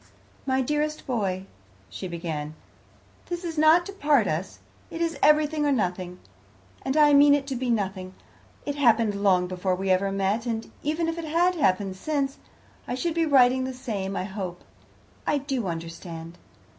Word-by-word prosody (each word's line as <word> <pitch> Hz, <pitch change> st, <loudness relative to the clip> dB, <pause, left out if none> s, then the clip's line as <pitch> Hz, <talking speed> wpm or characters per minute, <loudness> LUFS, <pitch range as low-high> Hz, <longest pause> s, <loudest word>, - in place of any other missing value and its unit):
"My 265 Hz, 0 st, +2 dB
dearest 300 Hz, +3 st, -1 dB
boy," 195 Hz, -7 st, -2 dB, 0.4 s
she 190 Hz, -, -7 dB
began, 160 Hz, -3 st, -5 dB, 0.7 s
"this 350 Hz, 0 st, -4 dB
is 335 Hz, -2 st, -4 dB
not 315 Hz, +3 st, +5 dB
to 395 Hz, -, -7 dB
part 290 Hz, -, +3 dB
us. 160 Hz, +5 st, -3 dB, 0.3 s
It 330 Hz, -, -7 dB
is 335 Hz, -1 st, 0 dB
everything 300 Hz, 0 st, +4 dB
or 290 Hz, -, +2 dB
nothing, 180 Hz, -6 st, -1 dB, 0.6 s
and 265 Hz, +3 st, -1 dB
I 295 Hz, -1 st, +6 dB
mean 285 Hz, 0 st, +7 dB
it 280 Hz, -1 st, -2 dB
to 275 Hz, -1 st, -4 dB
be 250 Hz, 0 st, -2 dB
nothing. 190 Hz, -4 st, -2 dB, 0.5 s
It 285 Hz, -, -1 dB
happened 230 Hz, -6 st, +3 dB
long 195 Hz, -3 st, +2 dB
before 185 Hz, +1 st, -1 dB
we 190 Hz, +1 st, -1 dB
ever 195 Hz, +1 st, +2 dB
met, 195 Hz, +4 st, 0 dB
and 225 Hz, -1 st, -3 dB
even 315 Hz, +3 st, -1 dB
if 330 Hz, +1 st, -2 dB
it 330 Hz, -, -5 dB
had 340 Hz, +4 st, +2 dB
happened 195 Hz, -, +1 dB
since, 280 Hz, +3 st, -2 dB, 0.5 s
I 245 Hz, -, -2 dB
should 330 Hz, +6 st, -1 dB
be 330 Hz, 0 st, +1 dB
writing 260 Hz, -2 st, +5 dB
the 260 Hz, 0 st, -4 dB
same, 205 Hz, -7 st, -4 dB
I -, -, -1 dB
hope. 190 Hz, -2 st, -6 dB, 0.6 s
I 295 Hz, -, +2 dB
do 270 Hz, -6 st, -2 dB
understand." 165 Hz, 0 st, -7 dB
245 Hz, 170 wpm, -26 LUFS, 190-295 Hz, 0.7 s, mean